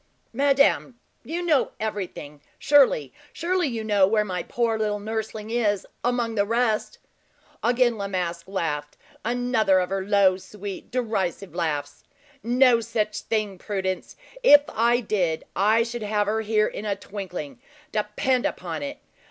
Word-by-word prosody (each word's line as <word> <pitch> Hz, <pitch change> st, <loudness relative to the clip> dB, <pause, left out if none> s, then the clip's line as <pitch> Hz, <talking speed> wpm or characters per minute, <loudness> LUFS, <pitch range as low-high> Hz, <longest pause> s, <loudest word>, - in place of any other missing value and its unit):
"Madame, 275 Hz, -1 st, +2 dB, 0.2 s
you 340 Hz, +3 st, -4 dB
know 305 Hz, -6 st, +2 dB
everything 185 Hz, -9 st, -5 dB, 0.2 s
surely, 260 Hz, -, +4 dB, 0.2 s
surely 355 Hz, 0 st, 0 dB
you 230 Hz, -4 st, -3 dB
know 205 Hz, -3 st, +4 dB
where 210 Hz, +1 st, +2 dB
my 180 Hz, -3 st, -3 dB
poor 230 Hz, +2 st, 0 dB
little 210 Hz, -1 st, -1 dB
nursling 220 Hz, 0 st, -4 dB
is, 210 Hz, -5 st, +1 dB, 0.2 s
among 240 Hz, -1 st, 0 dB
the 205 Hz, -2 st, +2 dB
rest." 225 Hz, 0 st, 0 dB, 0.6 s
Again 240 Hz, -2 st, +2 dB
La 200 Hz, -, -2 dB
Masque 175 Hz, -3 st, -3 dB
laughed 150 Hz, -6 st, -3 dB, 0.3 s
another 240 Hz, -4 st, +2 dB
of 180 Hz, 0 st, -2 dB
her 195 Hz, -1 st, -1 dB
low, 195 Hz, -2 st, +4 dB
sweet, 200 Hz, 0 st, -8 dB
derisive 200 Hz, -6 st, -2 dB
laughs. 150 Hz, -4 st, -3 dB, 0.4 s
"No 245 Hz, 0 st, +4 dB
such 215 Hz, -2 st, -2 dB
thing, 210 Hz, -4 st, -2 dB
Prudence. 190 Hz, -2 st, -3 dB, 0.3 s
If 290 Hz, -12 st, +8 dB
I 235 Hz, +2 st, +2 dB
did, 180 Hz, -8 st, 0 dB
I 215 Hz, +4 st, +4 dB
should 235 Hz, 0 st, -5 dB
have 210 Hz, 0 st, 0 dB
her 220 Hz, +2 st, 0 dB
here 215 Hz, 0 st, +2 dB
in -, -, -5 dB
a 205 Hz, -1 st, 0 dB
twinkling, 190 Hz, -, -7 dB, 0.3 s
depend 215 Hz, +4 st, 0 dB
upon 165 Hz, -4 st, -5 dB
it. 140 Hz, -, -5 dB
215 Hz, 145 wpm, -25 LUFS, 190-235 Hz, 0.6 s, If